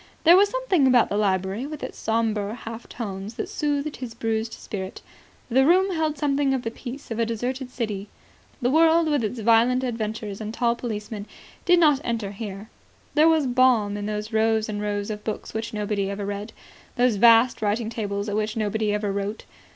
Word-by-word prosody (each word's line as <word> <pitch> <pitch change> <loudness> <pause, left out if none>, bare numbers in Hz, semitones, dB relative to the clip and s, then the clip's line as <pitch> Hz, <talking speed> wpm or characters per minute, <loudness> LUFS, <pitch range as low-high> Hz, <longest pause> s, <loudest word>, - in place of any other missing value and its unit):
There 340 +2 +8
was 400 +2 +5
something 410 - +2
about 250 -2 +4
the - - -2
library 195 +3 0
with 305 -1 -7
its - - -5
sombre 220 -2 -1
half 230 0 -9
tones 205 -1 -6
that - - -3
soothed 290 0 -2
his 245 -3 -7
bruised 225 -1 -2
spirit. 190 -2 -7 0.4
The 260 +2 +3
room 370 +6 +4
held 315 -2 -1
something 280 -1 +1
of 255 - -3
the 225 - -3
peace 255 +2 -9
of 225 - -3
a 230 - +2
deserted 250 +3 -3
city. 215 -5 -4 0.6
The 245 - +2
world, 325 +2 +5
with 290 -5 +1
its 220 +2 -3
violent 235 +3 +4
adventures 220 -4 -4
and 215 0 -4
tall 235 -1 +1
policemen, 215 -3 -5 0.4
did 355 -1 +5
not 295 -4 +4
enter 225 -4 -2
here. 205 0 -7 0.4
There 310 +2 +5
was 320 -3 +3
balm 245 -5 +3
in 205 0 -4
those 210 +1 -4
rows 220 0 +2
and 210 -1 -4
rows 205 0 -2
of 210 0 -6
books 215 - -5
which 220 +1 -3
nobody 205 -2 -2
ever 200 0 -4
read, 205 +2 -5 0.4
those 245 -4 +2
vast 230 +3 +5
writing 215 +2 0
tables 205 -2 -3
at 205 - -2
which 215 +1 -1
nobody 215 0 0
ever 210 -1 -1
wrote. 200 +2 -4
225 Hz, 190 wpm, -24 LUFS, 210-260 Hz, 0.6 s, There